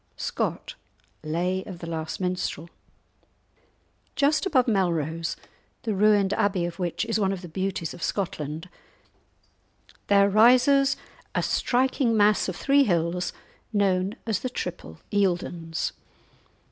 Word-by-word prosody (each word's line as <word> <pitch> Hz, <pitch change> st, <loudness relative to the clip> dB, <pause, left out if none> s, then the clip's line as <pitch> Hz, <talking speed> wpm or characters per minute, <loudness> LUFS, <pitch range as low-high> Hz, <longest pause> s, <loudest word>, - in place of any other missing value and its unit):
SCOTT: -, -, -3 dB, 0.5 s
Lay 180 Hz, +4 st, -1 dB
of 190 Hz, -4 st, -8 dB
the 170 Hz, -, -8 dB
Last 160 Hz, -1 st, -4 dB
Minstrel. 180 Hz, -3 st, -3 dB, 1.4 s
Just 300 Hz, +6 st, +2 dB
above 260 Hz, -9 st, +3 dB
Melrose, 165 Hz, -6 st, 0 dB, 0.5 s
the 220 Hz, -, -1 dB
ruined 205 Hz, -1 st, +3 dB
abbey 195 Hz, -4 st, +1 dB
of 175 Hz, +1 st, -6 dB
which 175 Hz, -1 st, -1 dB
is 220 Hz, -, 0 dB
one 195 Hz, -2 st, +2 dB
of 190 Hz, -1 st, -5 dB
the -, -, -6 dB
beauties 185 Hz, -1 st, -3 dB
of -, -, -11 dB
Scotland, 160 Hz, -4 st, -3 dB, 1.4 s
there 200 Hz, 0 st, +5 dB
rises 250 Hz, +6 st, +5 dB, 0.4 s
a -, -, +1 dB
striking 255 Hz, -2 st, +1 dB
mass 210 Hz, -1 st, +3 dB
of 185 Hz, -, -4 dB
three 280 Hz, +7 st, +4 dB
hills 175 Hz, -1 st, 0 dB, 0.4 s
known 195 Hz, -1 st, +1 dB
as 220 Hz, -4 st, 0 dB
"the 255 Hz, -, -3 dB
triple 175 Hz, -, -6 dB
Eildons." 175 Hz, -4 st, -1 dB
190 Hz, 120 wpm, -26 LUFS, 170-215 Hz, 1.4 s, there